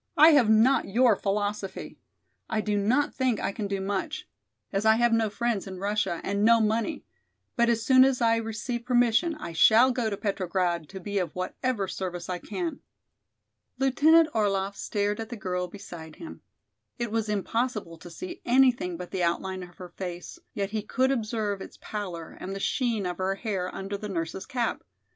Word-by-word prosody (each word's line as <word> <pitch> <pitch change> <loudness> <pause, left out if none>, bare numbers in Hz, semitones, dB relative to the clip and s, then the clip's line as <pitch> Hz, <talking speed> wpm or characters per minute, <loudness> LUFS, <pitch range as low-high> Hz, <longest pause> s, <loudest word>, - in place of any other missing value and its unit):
I 310 +2 +9
have 280 -8 +5
not 225 +5 +4
your 230 +2 +4
philosophy. 205 0 -3 0.5
I 220 - 0
do 210 -1 0
not 235 +9 +2
think 255 -4 0
I - - -1
can 205 0 -4
do 200 -1 -2
much, 200 - -3 0.5
as 195 +1 0
I 220 0 +5
have 240 0 +3
no 225 -1 +2
friends 230 -2 -1
in 190 -1 -7
Russia 200 -3 -1
and 200 +1 -1
no 230 +1 +6
money, 220 +6 0 0.5
but 235 0 +3
as 230 -1 +1
soon 260 0 +7
as 265 -1 +2
I 230 -1 +3
receive 230 +2 -4
permission 245 +6 +2
I 300 - -7
shall 225 +9 +6
go 240 -3 -1
to 200 - -3
Petrograd 180 -5 -1
to 190 - -8
be 200 +1 -2
of 180 - -3
whatever 200 +3 -2
service 180 -2 -5
I 180 -1 -2
can." 335 - -4 1.0
Lieutenant 305 +5 +5
Orlaff 200 -2 0
stared 205 +1 -1
at 225 0 -5
the 240 - -6
girl 180 -2 -2
beside 170 -4 -10
him. 325 - -10 0.6
It 235 -3 -3
was 225 -1 -1
impossible 210 -4 -2
to 175 - -11
see 350 - -8
anything 245 -8 +3
but 180 0 -8
the 190 - -2
outline 185 +2 -1
of 175 -1 -11
her 180 -1 -9
face, 180 -2 -7 0.2
yet 200 -1 -2
he 215 -1 -1
could 260 +5 +1
observe 215 -5 -2
its - - -10
pallor 180 -6 -6
and 195 +1 -5
the - - -4
sheen 230 -2 0
of 180 0 -4
her 190 +1 0
hair 195 -3 -3
under 195 +1 -5
the 210 - -6
nurse's 165 0 -4
cap. 245 -2 -2
210 Hz, 185 wpm, -27 LUFS, 190-240 Hz, 1.0 s, I